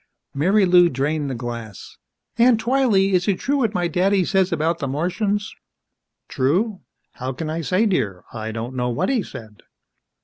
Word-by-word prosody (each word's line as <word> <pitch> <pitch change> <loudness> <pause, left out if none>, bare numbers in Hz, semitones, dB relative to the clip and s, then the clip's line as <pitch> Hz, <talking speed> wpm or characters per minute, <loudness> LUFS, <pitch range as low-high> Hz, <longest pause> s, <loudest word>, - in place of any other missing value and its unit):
Marilou 180 +2 +4
drained 145 +2 -1
the 130 - -3
glass. 115 -4 -7 0.4
"Aunt 235 -1 +5
Twylee 225 -6 +2
is 180 -1 +2
it 195 -3 +2
true 285 +8 -1
what 230 -6 0
my 175 -1 +1
daddy 185 +3 +2
says 190 0 +1
about 165 +1 0
the 140 - -2
Martians?" 195 - -1 0.7
"True? 185 - 0 0.3
How 130 +1 -5
can 155 +4 -5
I 165 +1 -3
say, 185 - +1
dear? 105 - -1
I 110 -1 -5
don't 115 +3 -5
know 125 -1 -1
what 120 - -1
he 260 -4 +1
said." 110 - -11
175 Hz, 165 wpm, -21 LUFS, 130-200 Hz, 0.7 s, Aunt